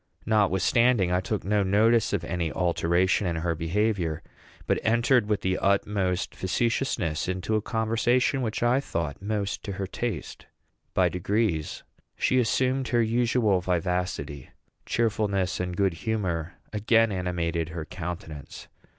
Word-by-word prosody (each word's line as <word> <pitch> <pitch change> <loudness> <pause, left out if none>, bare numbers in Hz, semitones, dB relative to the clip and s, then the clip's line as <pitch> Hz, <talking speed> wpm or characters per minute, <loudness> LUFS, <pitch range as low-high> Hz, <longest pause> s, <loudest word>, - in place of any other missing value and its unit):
Notwithstanding, 105 0 +3
I 90 +1 +2
took 105 +2 -3
no 105 +1 +1
notice 110 +4 +3
of 100 -5 -1
any 85 -1 -2
alteration 90 +2 +1
in 85 - -1
her 85 +1 -1
behavior, 85 0 -1 0.4
but - - +1
entered 120 0 +3
with 105 - +1
the 95 0 0
utmost 100 -2 0
facetiousness 95 - -1
into 95 +4 -2
a 110 - +1
conversation 115 +4 +1
which 115 -1 -2
I 120 +2 +3
thought 85 - -4
most 105 -1 -2
to 100 - -4
her 95 0 -3
taste. 105 0 -5 0.5
By - - +4
degrees 90 -3 -1 0.3
she 130 - +2
assumed 130 +2 +1
her 120 -1 +2
usual 115 -4 +2
vivacity; 90 -5 -2 0.4
cheerfulness 105 -5 0
and 90 -1 -3
good 95 -3 +2
humor 90 -3 -2 0.2
again 110 +1 +3
animated 85 -3 -2
her 80 -1 -5
countenance. 80 -5 -7
100 Hz, 135 wpm, -26 LUFS, 90-110 Hz, 0.5 s, By